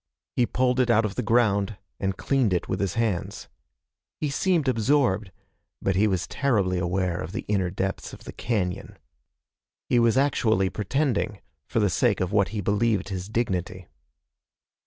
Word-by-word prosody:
He 120 - +2
pulled 125 0 +1
it 125 -1 +2
out 115 -1 +4
of 100 - -2
the - - -2
ground 105 -3 +2 0.2
and 95 -1 -1
cleaned 130 -8 +1
it 90 - -1
with - - -2
his 100 -3 -1
hands. 110 -7 -2 0.7
He 150 -2 -1
seemed 170 -1 +1
absorbed, 115 -5 +2 0.5
but 95 - 0
he 105 +3 +4
was 95 -4 0
terribly 100 -10 0
aware 90 0 -1
of 80 +5 -6
the - - -4
inner 95 -3 +1
depths 95 +1 -3
of - - -12
the - - -9
cañon. 100 -6 -2 0.9
He 120 - +4
was 115 +1 +3
actually 110 -8 +2
pretending, 110 -2 -1 0.3
for - - 0
the 105 - +3
sake 110 +3 +2
of 90 0 -1
what 100 -3 +3
he 105 -1 -4
believed 105 +1 +1
his 95 0 -5
dignity. 95 -5 -2
105 Hz, 165 wpm, -25 LUFS, 95-120 Hz, 0.9 s, out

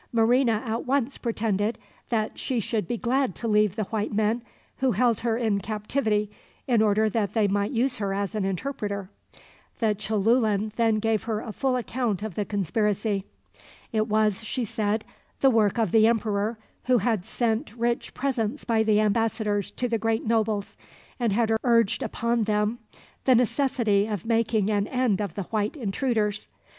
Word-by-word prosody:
Marina 235 0 +3
at 225 +1 -3
once 275 0 +1
pretended 220 -2 -1 0.3
that 220 -2 -1
she 255 -3 -1
should 215 -3 -2
be 240 - -2
glad 255 -2 0
to 235 - -4
leave 210 -2 +3
the 215 - -1
white 210 +1 -2
men, 220 +2 +1 0.4
who 265 -2 +1
held 230 +2 +2
her 225 -1 0
in 220 -4 +1
captivity 210 +1 -1 0.4
in 235 -4 +3
order 215 0 +3
that 210 -1 -1
they 215 -2 +3
might 200 +1 0
use 250 +1 0
her 200 -2 -2
as 200 +1 -2
an 215 -2 -1
interpreter. 200 -1 -3 0.7
The 220 -2 +2
Cholulan 215 +1 +1
then 225 -2 +3
gave 220 0 0
her 220 -2 -1
a 220 - -6
full 260 +4 0
account 235 -5 -2
of 215 -3 -4
the 205 +4 -2
conspiracy. 205 +1 0 0.7
It 220 -1 +1
was, 215 -1 +1
she 240 +3 -2
said, 215 -1 -1 0.4
the 270 - +6
work 220 -2 +2
of 220 -6 +1
the 220 -1 +6
emperor, 220 -1 0 0.3
who 255 -1 +4
had 220 -3 0
sent 225 0 -1
rich 235 0 -1
presents 255 -1 -2
by 225 -2 +2
the 215 -1 +3
ambassadors 215 -1 +1
to 250 - -3
the 230 -2 -1
great 225 0 0
nobles, 215 -2 0 0.4
and 235 -3 +1
had 225 +2 +1
urged 230 -4 +3
upon 235 -2 0
them 210 +2 0 0.5
the 260 - +6
necessity 235 -4 +2
of 210 -4 -4
making 225 -2 +1
an 205 -1 +1
end 250 -6 +1
of 200 -5 -4
the 200 - -3
white 210 - -2
intruders. 215 -2 -1
220 Hz, 170 wpm, -26 LUFS, 210-235 Hz, 0.7 s, the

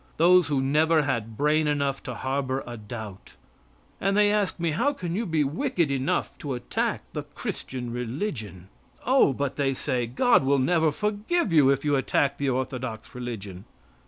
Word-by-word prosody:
Those 180 +2 +5
who 140 -3 +1
never 155 +3 +3
had 115 -5 -2
brain 150 +1 +2
enough 140 -2 0
to 125 -3 -5
harbor 130 +1 -2
a 120 - -7
doubt. 110 -3 -9 0.6
And 195 +1 +1
they 205 0 +5
ask 205 -5 0
me: 170 -1 0
How 250 - +1
can 175 -10 -5
you 220 +2 -1
be 160 -3 +2
wicked 170 - 0
enough 135 0 -1
to 140 -4 -3
attack 125 - -2
the - - -2
Christian 125 -2 -6
religion? 115 - -4 0.4
"Oh," 260 - +5
but 140 +1 -3
they 135 -2 +1
say, 125 -2 -1
"God 235 - +3
will 140 +1 +3
never 160 +4 +2
forgive 210 - -1
you 145 -4 +6
if 140 +1 +1
you 145 -1 +3
attack 140 +1 +1
the 140 -1 0
orthodox 130 -3 -4
religion." 105 -7 -7
140 Hz, 170 wpm, -26 LUFS, 125-165 Hz, 0.6 s, you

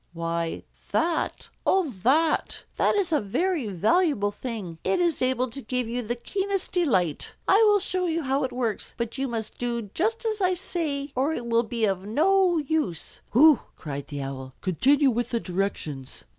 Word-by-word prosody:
Why 165 0 -2 0.3
that 330 0 0 0.2
oh, 365 -9 +2
that! 305 - +2
That - - +3
is 390 -4 +1
a 305 - +3
very 310 - 0
valuable 210 - +2
thing. 205 -7 -6
It 370 - +1
is 345 -3 +1
able 255 0 +1
to 275 +3 -7
give 250 0 -2
you 240 +2 -2
the 240 +1 -3
keenest 390 +9 -2
delight. 210 - 0
I 390 - +6
will 415 -1 +6
show 370 -2 -1
you 330 -1 -1
how 270 +1 +1
it 260 - -1
works. 240 -4 -3
But 235 +2 -3
you 270 - 0
must 225 -3 -5
do 235 -4 -3
just 450 +6 0
as 430 -2 -1
I 370 -1 +3
say, 310 -6 -3
or 275 +5 +1
it 240 - -4
will 230 0 +3
be 230 -1 -1
of 190 -2 -1
no 360 - +3
use." 300 - -2
"Hoo!" 295 +2 +7 0.2
cried 140 -2 -6
the 145 -2 -5
Owl. 130 -1 -7
"Continue 270 - +3
with 240 +1 -1
the 235 - 0
directions." 175 - -4
255 Hz, 180 wpm, -26 LUFS, 205-330 Hz, 0.3 s, Hoo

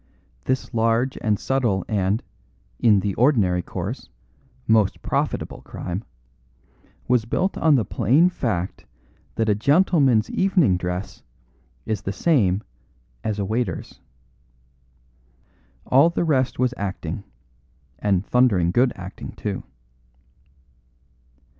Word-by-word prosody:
This 130 0 -2
large 115 +3 +1
and 105 -2 +1
subtle 120 -9 0
and 100 0 0 0.6
(in 105 -4 +4
the 100 0 -1
ordinary 105 -9 +2
course) - - -6 0.6
most 110 -3 +2
profitable - - -2
crime, 90 +4 -6 1.0
was 125 -3 +2
built 185 +11 -1
on 155 -3 +4
the 115 -6 +1
plain 130 - +3
fact 110 - -3 0.5
that 115 - 0
a 105 - +4
gentleman's 140 - +3
evening 185 - +3
dress 90 +2 -4 0.6
is 110 -2 -2
the 100 - -3
same 105 - +2 0.6
as 110 -2 -2
a 100 - -1
waiter's. 115 +4 -3 1.9
All 140 +6 +5
the 170 - -1
rest 130 -5 +1
was 125 -1 +1
acting, 95 -2 -4 0.8
and 100 -2 +1
thundering 105 -9 +3
good 125 +6 +3
acting, 95 +1 -8
too." - - -4
110 Hz, 110 wpm, -23 LUFS, 95-130 Hz, 1.9 s, All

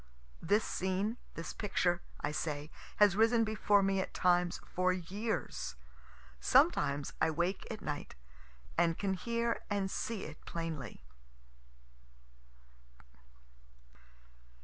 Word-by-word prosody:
This 205 +6 +3
scene, 190 +5 -1 0.2
this 165 -1 -5
picture, 175 -4 +1 0.2
I 150 - -1
say, 150 -1 -3 0.2
has 205 -3 +5
risen 225 +2 +4
before 210 -2 +3
me 195 0 +2
at - - -6
times 175 -1 +3
for 185 0 +1
years. 190 - -3 0.6
Sometimes 140 - +3
I - - +4
wake 170 +4 -1
at - - -5
night - - -4 0.6
and 170 -1 +3
can 195 -1 0
hear 235 +4 -1
and 200 -2 0
see 225 -3 -2
it 155 0 -9
plainly. 160 - -5
185 Hz, 105 wpm, -34 LUFS, 165-210 Hz, 0.6 s, has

